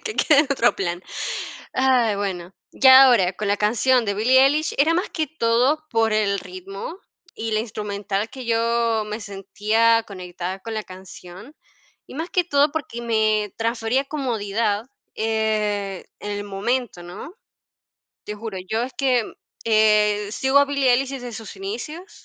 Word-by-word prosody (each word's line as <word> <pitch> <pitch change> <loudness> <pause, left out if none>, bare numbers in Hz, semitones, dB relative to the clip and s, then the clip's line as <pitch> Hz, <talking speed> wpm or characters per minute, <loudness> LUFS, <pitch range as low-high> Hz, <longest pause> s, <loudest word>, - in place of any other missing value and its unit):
que 435 -2 -4
quede 295 -3 +4
en - - +2
otro 240 -3 +2
plan. 175 -2 -3 0.7
Ay, 255 -5 +2
bueno. 190 -2 -4 0.2
Ya 265 0 +8
ahora, 215 -9 +4
con 200 +2 -4
la 205 - +2
canción 235 +4 +2
de 200 -2 -1
Billie 250 +5 +4
Eilish, 300 +3 +1
era 315 +4 +4
más 360 +4 -1
que 315 -2 -2
todo 265 +2 +1
por 225 -2 +1
el 205 -2 +1
ritmo 195 - -8 0.4
y 225 0 -4
la 215 - +2
instrumental 205 -1 -4
que 260 -2 -9
yo 230 -1 +1
me 215 +2 -5
sentía 215 +3 +1
conectada 185 -1 -6
con 225 +2 -6
la 215 -1 -3
canción, 185 - -12 0.5
y - - -12
más 320 +5 -5
que 360 - +1
todo 285 -3 +3
porque 275 -6 -5
me 215 -3 +1
transfería 230 +3 0
comodidad, 225 -6 -2 0.3
eh, 215 -3 -1 0.2
en 205 - -5
el 205 0 -4
momento, 205 0 -2
¿no? 180 - -9 0.9
Te 210 - -6
juro, 210 -1 -7
yo 220 +4 -1
es 255 +1 -6
que, 250 -3 0 0.3
eh, 210 -2 +3
sigo 265 +4 +2
a 285 - +6
Billie 280 -2 +1
Eilish 260 +2 +1
desde 245 -3 -6
sus 220 -1 -9
inicios 245 - -6
225 Hz, 160 wpm, -22 LUFS, 205-260 Hz, 0.9 s, Ya